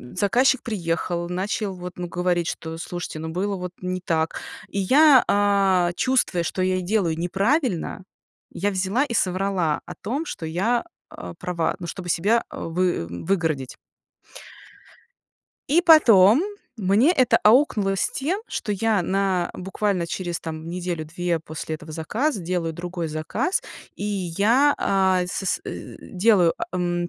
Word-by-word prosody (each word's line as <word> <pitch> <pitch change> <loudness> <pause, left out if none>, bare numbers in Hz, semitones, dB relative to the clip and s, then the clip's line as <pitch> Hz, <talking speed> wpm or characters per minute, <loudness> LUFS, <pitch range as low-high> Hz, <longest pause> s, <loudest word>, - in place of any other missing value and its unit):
заказчик 255 +6 +3
приехал, 175 -5 -2
начал 195 +2 -2
вот, 180 0 -7
ну, 180 - -4
говорить, 175 -1 0
что: 160 0 -5
"Слушайте, 175 -1 -6
ну, 160 +1 -5
было 195 +4 -2
вот 180 -1 -5
не 185 0 -3
так". 160 -2 -1 0.3
И 200 - -3
я, 270 +6 +6
а, 195 -3 +3
чувствуя, 250 -9 +1
что 185 +3 -3
я 185 0 +1
и - - -2
делаю 180 -4 0
неправильно, 195 - 0 0.5
я 205 +3 -1
взяла 195 +7 0
и 240 - -5
соврала 185 -5 0
о - - -8
том, 275 +10 -3
что 165 - -6
я, 205 - 0 0.2
а, - - -9
права, 170 -2 -2
ну, 175 - -6
чтобы 180 +1 -7
себя, 215 +8 +2
а, - - -8
вы 175 - 0
выгородить. 155 - -2 1.9
И 315 +5 +5
потом, 250 - +7 0.3
мне 210 - +3
это 255 -8 +4
аукнулось 210 -5 +3
тем, 335 +9 -2
что 210 - -3
я 210 -1 +1
на 190 -1 0
буквально 190 -1 -2
через, 175 -1 -4
там, 160 0 -6
неделю-две 175 -1 -3
после 155 0 -6
этого 155 0 -11
заказа, 210 - -1
делаю 170 -1 -2
другой 175 0 -5
заказ, 160 - -1 0.4
и - - -1
я, 210 - +2
а, 190 -2 +2
со 190 +1 -4
св - - -1
э, - - -7
делаю, 185 -3 +3
а, - - -2
м. 175 -1 -1
185 Hz, 145 wpm, -23 LUFS, 175-210 Hz, 1.9 s, потом